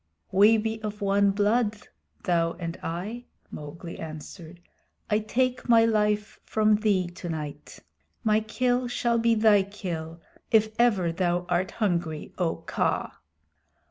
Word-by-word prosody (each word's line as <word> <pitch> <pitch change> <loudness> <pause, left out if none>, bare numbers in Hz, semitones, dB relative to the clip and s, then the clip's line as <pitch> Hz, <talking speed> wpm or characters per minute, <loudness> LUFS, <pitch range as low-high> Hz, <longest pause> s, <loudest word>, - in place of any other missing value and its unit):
"We 210 +4 +6
be 220 0 -2
one 200 -2 +1
blood, 210 +2 +1 0.5
thou 165 -2 +1
and 165 -1 -5
I," 205 +9 -5 0.3
Mowgli 165 +3 -8
answered. 160 +2 -9 0.5
"I 210 - +4
take 250 +4 -1
my 230 -1 +6
life 210 -1 0
from 215 -1 +2
thee 205 -4 +2
tonight. 160 -5 -6 0.5
My 215 -1 +3
kill 245 +3 0
shall 235 -1 0
be 230 0 +3
thy 215 -2 +5
kill 170 -5 -6 0.3
if 220 -1 +3
ever 200 -8 +3
thou 175 0 0
art 180 +1 +1
hungry, 170 -7 -1
O 170 -3 +1
Kaa." - - -1
205 Hz, 125 wpm, -26 LUFS, 175-220 Hz, 0.5 s, We